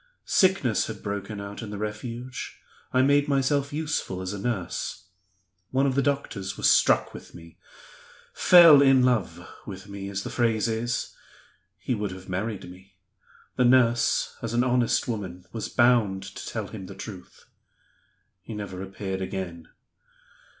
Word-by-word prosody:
Sickness 185 - +2
had 110 -1 -8
broken 100 0 -4
out 100 +2 -7
in 110 - -7
the 105 - -6
Refuge; 115 +4 -6 0.3
I 130 +1 +3
made 145 +2 +3
myself 140 +1 +1
useful 150 -11 -2
as 95 +2 -4
a 100 - -5
nurse. 95 -3 -4 0.6
One 135 +1 +1
of 135 - +1
the 140 - +2
doctors 130 -9 -2
was - - +2
struck - - +4
with - - -12
me 85 -1 -14 0.7
'fell 165 -5 +8
in 135 -2 +5
love' 125 -3 0 0.2
with - - -8
me, 100 -1 -7
as 100 0 -4
the - - -6
phrase 115 -2 +1
is. 115 +2 -2 0.6
He - - -2
would 105 -3 -2
have 95 0 -10
married 95 +1 -3
me. 95 +1 -15 0.6
The 125 - +4
nurse, 120 -2 +3
as 115 0 -3
an 120 - +3
honest 125 -1 +1
woman, 95 -6 -5
was 115 - -4
bound 115 -6 +3
to 100 - -9
tell - - -4
him 95 - -8
the 100 - -10
truth. 95 -2 -10 1.0
He 110 +3 -8
never 100 -3 -6
appeared 95 0 -5
again. 90 -3 -5
110 Hz, 155 wpm, -26 LUFS, 95-125 Hz, 1.0 s, fell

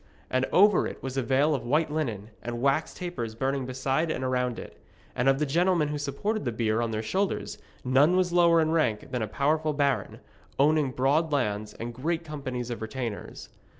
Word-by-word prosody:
And 130 +1 +2
over 205 0 +5
it - - -9
was 130 -1 -4
a 135 - +1
veil 135 +5 +2
of 140 - -2
white 150 +5 +1
linen, 115 -9 -3
and 120 0 -4
wax 140 +5 +1
tapers 130 -12 -5
burning 135 +1 -1
beside 135 +5 -1
and 130 - -2
around 125 -2 0
it, - - -10 0.3
and 125 +2 +2
of 135 - +3
the 150 - 0
gentlemen 170 +1 +2
who 150 0 -3
supported 200 +10 -2
the 120 - -1
bier 115 0 0
on 115 - -1
their 110 0 -3
shoulders 190 - -2 0.3
none 140 +8 +4
was 180 -2 +1
lower 170 -1 +5
in 155 0 +1
rank 130 -10 0
than 125 -3 -2
a 110 - -1
powerful 155 +6 0
baron, 140 -2 0 0.4
owning 150 0 +3
broad 140 +5 +1
lands 105 -6 -1
and 120 +1 -6
great 160 +7 -2
companies 130 -6 -5
of 115 - -5
retainers. 115 -1 -5
135 Hz, 195 wpm, -27 LUFS, 120-155 Hz, 0.4 s, over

